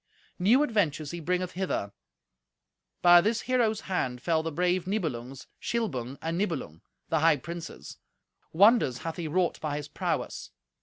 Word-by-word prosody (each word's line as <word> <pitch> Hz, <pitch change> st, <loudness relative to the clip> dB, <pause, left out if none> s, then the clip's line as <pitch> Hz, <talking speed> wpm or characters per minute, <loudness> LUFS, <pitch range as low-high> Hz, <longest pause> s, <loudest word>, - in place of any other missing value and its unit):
New 230 Hz, +10 st, +5 dB
adventures 165 Hz, -, 0 dB
he 170 Hz, -, -5 dB
bringeth 180 Hz, +2 st, -1 dB
hither. 180 Hz, -, -2 dB, 1.1 s
By 175 Hz, 0 st, +8 dB
this 220 Hz, +4 st, 0 dB
hero's 235 Hz, -4 st, +1 dB
hand 130 Hz, -10 st, -2 dB
fell 160 Hz, +4 st, +1 dB
the 165 Hz, 0 st, -4 dB
brave 180 Hz, +2 st, 0 dB
Nibelungs, 135 Hz, -, -3 dB, 0.2 s
Shilbung 140 Hz, -, -2 dB
and 165 Hz, +2 st, -2 dB
Nibelung, 150 Hz, -, -3 dB, 0.3 s
the 160 Hz, -, +2 dB
high 160 Hz, -1 st, +4 dB
princes. 170 Hz, +4 st, -8 dB, 0.5 s
Wonders 200 Hz, -, +5 dB
hath 165 Hz, -, -4 dB
he 170 Hz, -2 st, -3 dB
wrought 175 Hz, +3 st, 0 dB
by 150 Hz, -2 st, -2 dB
his 150 Hz, -1 st, -6 dB
prowess. -, -, -3 dB
170 Hz, 145 wpm, -28 LUFS, 150-190 Hz, 1.1 s, By